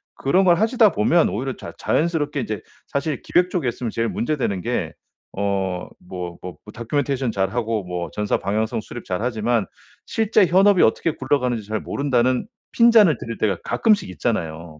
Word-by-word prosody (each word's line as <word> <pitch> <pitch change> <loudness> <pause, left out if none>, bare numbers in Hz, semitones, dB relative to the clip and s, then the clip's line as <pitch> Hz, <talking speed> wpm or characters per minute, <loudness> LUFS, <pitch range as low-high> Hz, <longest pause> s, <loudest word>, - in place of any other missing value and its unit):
그런 185 +8 +2
걸 175 -2 +5
하시다 225 -1 +4
보면 165 +11 +3
오히려 130 +4 -3
자 - - -9
자연스럽게 150 -4 0
이제 110 -2 -4 0.3
사실 140 -1 -2
기획 180 +1 +2
쪽에 165 -9 -1
있으면 120 0 -4
제일 115 0 -1
문제 150 +6 -2
되는 100 -8 -1
게 - - -2 0.4
어 95 -2 -2
뭐 90 -1 -7
뭐 90 -1 -7
뭐 105 - -12
다큐멘테이션 130 +1 -1
잘하고 110 +2 -1
뭐 90 -2 -4
전사 105 -1 0
방향성 110 +4 -1
수립 120 - -9
잘하지만 110 +2 -1 0.4
실제 220 -2 +2
현업이 190 +2 +5
어떻게 160 +8 +2
굴러가는지 125 -6 -1
잘 110 0 -2
모른다는 130 - 0 0.3
핀잔을 230 - +6
들을 115 -1 -6
때가 100 -4 +1
가끔씩 200 - +2
있잖아요. 80 -1 -3
120 Hz, 375 characters per minute, -22 LUFS, 100-155 Hz, 0.4 s, 핀잔을